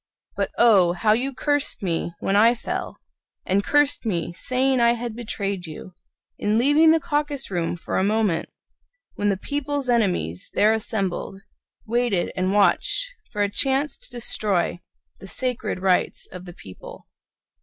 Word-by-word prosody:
But - - -1
oh, 195 -7 +5
how 210 +4 +2
you 255 +5 0
cursed 290 -2 -1
me 170 -2 -1
when 195 - 0
I 230 +4 +5
fell, - - -5 0.5
And 195 +2 +1
cursed 290 +3 +2
me, 175 -6 -2
saying 255 +7 +1
I 235 0 +4
had 235 -1 -5
betrayed 200 -6 -4
you, 160 +3 -10 0.5
In 210 +1 +1
leaving 290 +6 +5
the 325 +1 +5
caucus 290 -4 -2
room 175 -2 -1
for - - -2
a - - +1
moment, 210 -4 0 0.6
When 205 - -1
the 195 - 0
people's 285 +3 -3
enemies, 180 - 0
there 215 +1 +4
assembled, 195 -3 -3 0.4
Waited 235 -5 0
and 185 0 0
watched 210 - +2 0.2
for 205 -3 -1
a - - +2
chance 270 +6 +2
to - - -9
destroy 200 -7 0 0.4
The 195 - -11
Sacred 250 -2 -2
Rights 185 -2 +1
of 180 0 -9
the 175 - -10
People. 95 - -12
215 Hz, 155 wpm, -23 LUFS, 190-260 Hz, 0.6 s, oh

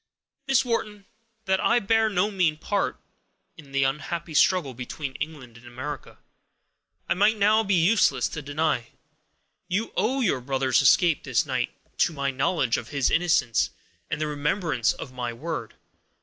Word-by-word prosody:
"Miss 270 -1 +3
Wharton, 210 -4 -2 0.4
that 190 -1 +2
I - - +3
bear 225 0 +2
no 205 +1 +1
mean 175 -6 +1
part, 200 +5 -1 0.6
in 145 -4 -15
the 140 0 +1
unhappy 160 +5 -3
struggle 150 -2 +3
between 130 +3 -6
England 145 -7 -7
and 120 - -16
America, 130 +4 -7 0.9
it - - +2
might 210 +4 +3
now 215 +2 +4
be 200 -2 +1
useless 170 - +3
to 150 - -6
deny. 145 -4 -1 0.8
You 205 +5 -2
owe 265 +4 +1
your 170 - +1
brother's 130 -1 +1
escape, 170 -5 +4
this - - +1
night, - - -1 0.3
to 170 - +3
my 140 -2 -1
knowledge 135 -1 +1
of 115 - -6
his 140 0 0
innocence, 165 -9 +2 0.4
and 155 - -2
the 155 - 0
remembrance 150 - 0
of 130 - -8
my 125 -2 -3
word. 130 -3 -5
155 Hz, 155 wpm, -25 LUFS, 135-195 Hz, 0.9 s, now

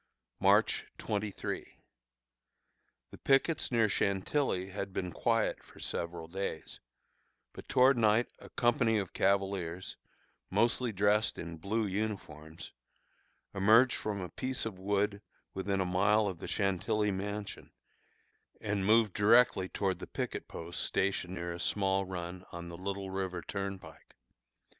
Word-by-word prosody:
March - - +3
23. 105 -1 -4 1.4
The - - -10
pickets 140 +3 +2
near 115 -2 +4
Chantilly 95 0 0
had 100 0 -5
been 90 -1 -3
quiet 115 +2 +1
for - - -17
several 85 -1 -4
days, 95 +4 -5 0.7
but - - -11
toward 130 0 +5
night 110 +1 +4
a - - -12
company 115 -2 +2
of 100 -4 -3
cavaliers, 95 -2 0 0.5
mostly 120 +1 +2
dressed 105 +2 +2
in 85 0 -6
blue 110 +6 0
uniforms, 95 -6 -5 0.8
emerged 110 +6 +5
from 105 -2 -3
a 90 - -5
piece 130 -2 -3
of 100 -5 -5
wood 100 +1 0 0.3
within 95 +1 -1
a 95 - +1
mile 100 +4 +3
of 95 -4 -3
the - - -6
Chantilly 100 +1 0
mansion, 100 +2 -5 0.9
and 100 -2 -1
moved 110 -2 +4
directly 105 -3 +4
toward 95 -2 -1
the - - -7
picket - - -4
post 85 +1 -6
stationed 95 -1 -1
near 85 -1 -4
a 85 - -7
small 95 0 +1
run 90 0 -5
on 85 0 -7
the 85 - -7
Little 95 +1 -4
River 95 -2 -3
Turnpike. 100 -1 -6
100 Hz, 130 wpm, -32 LUFS, 95-110 Hz, 1.4 s, toward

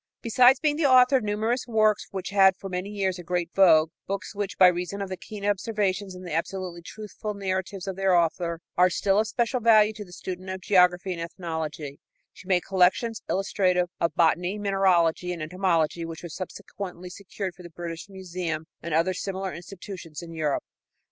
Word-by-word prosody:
Besides 250 +3 +5
being 300 -1 +1
the 315 - +1
author 255 0 +6
of 250 - -3
numerous 215 +4 -1
books 215 -2 +2
which 190 0 -5
had 195 -1 +6
for 195 - -7
many 180 +2 -3
years 195 -3 -1
a - - -8
great 175 0 -2
vogue 160 -5 +5 0.2
books 195 -1 -4
which, 205 -1 -4
by 185 - +8
reason 180 +2 +1
of 200 -1 -4
the 185 - -3
keen 205 +2 -8
observations 200 -2 -1
and 180 0 -10
the 175 - -5
absolutely 175 0 -3
truthful 210 +3 -7
narratives 190 -1 -3
of 195 -1 -4
their 195 -1 +3
author, 170 0 0
are 180 +1 +5
still 195 +3 +2
of 220 - +1
special 240 +2 0
value 220 -2 +5
to 210 - -7
the 180 - -16
student 185 +1 -7
of 190 0 -4
geography 180 -1 +3
and 170 - -6
ethnology 160 -4 -5 0.3
she 185 - -15
made 180 -2 +2
collections 195 +5 +2
illustrative 185 -2 +1
of 170 - 0
botany, 175 +4 +2
mineralogy 185 -4 +2
and 165 -3 -5
entomology 170 -1 0
which 165 0 -7
were 175 - -6
subsequently 185 +1 -7
secured 195 0 -6
for 180 - -15
the 175 - -10
British 170 +2 -7
Museum 180 -4 -4 0.2
and 170 -2 -2
other 170 +3 +2
similar 190 +1 -4
institutions 175 -2 -9
in 165 -1 -9
Europe. 155 -3 -1
185 Hz, 190 wpm, -26 LUFS, 175-200 Hz, 0.3 s, by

